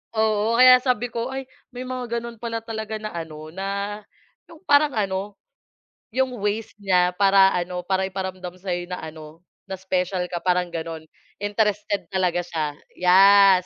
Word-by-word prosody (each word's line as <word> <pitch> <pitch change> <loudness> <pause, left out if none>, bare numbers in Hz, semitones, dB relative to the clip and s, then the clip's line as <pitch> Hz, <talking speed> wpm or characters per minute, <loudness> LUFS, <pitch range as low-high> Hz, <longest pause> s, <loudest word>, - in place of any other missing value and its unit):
Oo, 220 +1 +2
kaya 255 +1 +8
sabi 245 -2 -1
ko, 235 +1 -3
ay 265 0 -4 0.3
may 250 - -5
mga 250 -2 -3
gano'n 235 -1 -9
pala 230 -1 -4
talaga 220 -1 -5
na 215 0 -5
ano, 155 -2 -7
na 200 +3 -3 0.5
'yong 330 0 -16
parang 290 -3 +4
ano, 200 -1 -2 0.8
'yong 255 -2 0
ways 210 +2 -2
niya 180 -3 +3
para 195 0 +5
ano, 180 0 -3
para 190 +1 0
iparamdam 185 -1 -5
sa'yo 175 -2 -3
na 180 - -4
ano, 155 +1 -10 0.2
na 190 - -4
special 185 -1 -1
ka 175 - -2
parang 180 -1 +1
gano'n. 165 -1 -5 0.4
Interested 205 -1 0
talaga 180 -2 +1
siya, 155 -4 -3 0.2
yes! 190 +1 +6
195 Hz, 155 wpm, -23 LUFS, 180-225 Hz, 0.8 s, kaya